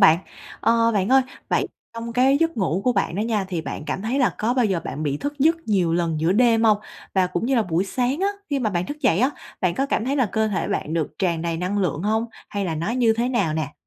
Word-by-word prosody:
bạn? 160 +2 +7 0.4
Ờ, 230 0 +3
bạn 195 0 +1
ơi, 265 +1 +6 0.3
vậy - - +1 0.3
trong 230 0 -5
cái 260 +3 +4
giấc 330 -5 +1
ngủ 185 -2 0
của 250 - +3
bạn 170 - 0
đó 200 - -2
nha 215 -3 0
thì 175 -3 -2
bạn 155 - -6
cảm 190 - -3
thấy 245 +6 -1
là 255 - +2
có 235 +4 +1
bao 250 -3 +3
giờ 190 -5 +1
bạn 150 - -4
bị 145 -2 -1
thức 290 - -5
giấc 320 +5 +4
nhiều 180 -5 +2
lần 165 -2 0
giữa 165 +3 +2
đêm 230 0 +4
hông? 215 -2 +5 0.4
Và 185 -1 +3
cũng 180 +6 -2
như 270 - +2
là 230 - +3
buổi 180 0 0
sáng 255 - -1
á, 395 - +2 0.2
khi 280 - +1
mà 220 -5 0
bạn 180 -1 -1
thức 295 +1 -6
dậy 250 - +3
á, 260 +3 +3 0.3
bạn 180 -2 +1
có 270 +1 0
cảm 230 - 0
thấy 275 +3 0
là 255 -5 +3
cơ 220 -1 +1
thể 195 - -2
bạn 155 - -2
được 160 -3 -1
tràn 170 -4 0
đầy 165 -1 -1
năng 185 +4 -1
lượng 175 -3 -1
hông, 220 +2 +1 0.2
hay 200 -1 -2
là 165 -3 -2
nó 170 +8 -2
như 235 -2 +3
thế 235 +2 0
nào 200 -11 0
nè? 155 -2 -2
210 Hz, 275 wpm, -23 LUFS, 175-245 Hz, 0.4 s, bạn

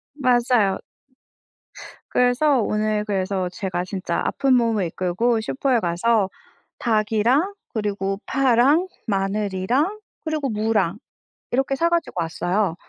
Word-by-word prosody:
맞아요. 245 -6 +2 1.3
그래서 250 +2 +3
오늘 210 0 0
그래서 190 -2 -1
제가 185 -2 -3
진짜 185 -3 -3
아픈 270 -2 +2
몸을 225 -6 +2
이끌고 220 +7 0
슈퍼에 260 +1 0
가서 195 +4 +1 0.5
닭이랑 230 - +2 0.2
그리고 200 -2 -2
파랑 270 +6 +3 0.2
마늘이랑 205 - 0 0.3
그리고 305 -4 -1
무랑 210 -4 0 0.5
이렇게 270 +2 +1
사 335 +4 +2
가지고 335 - -1
왔어요. 175 +2 -1
215 Hz, 250 characters per minute, -22 LUFS, 195-255 Hz, 1.3 s, 그래서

